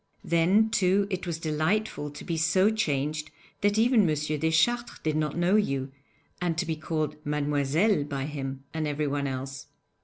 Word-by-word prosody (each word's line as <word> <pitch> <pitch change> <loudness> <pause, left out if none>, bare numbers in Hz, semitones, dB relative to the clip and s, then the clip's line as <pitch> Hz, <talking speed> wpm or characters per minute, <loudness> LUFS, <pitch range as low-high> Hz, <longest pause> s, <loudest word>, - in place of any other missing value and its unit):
Then, 185 +7 +3
too, 195 -2 +3
it 185 -1 -3
was 170 -2 -2
delightful 155 +1 -1
to 145 - -10
be 170 - -2
so 170 +6 +3
changed 150 -6 -1 0.3
that 205 +1 +2
even 235 +1 +5
M. 155 - +2
Deschartres 160 +11 +1
did 155 -1 0
not 155 0 -1
know 175 +4 +3
you, 135 -10 -1 0.5
and 170 -2 0
to 180 - 0
be 160 -1 -2
called 155 -1 -3
'Mademoiselle' 150 +4 +1
by 140 -2 -3
him 135 -2 -5
and 160 -1 -1
everyone 145 -1 -1
else. 135 +1 -5
155 Hz, 160 wpm, -27 LUFS, 145-185 Hz, 0.5 s, even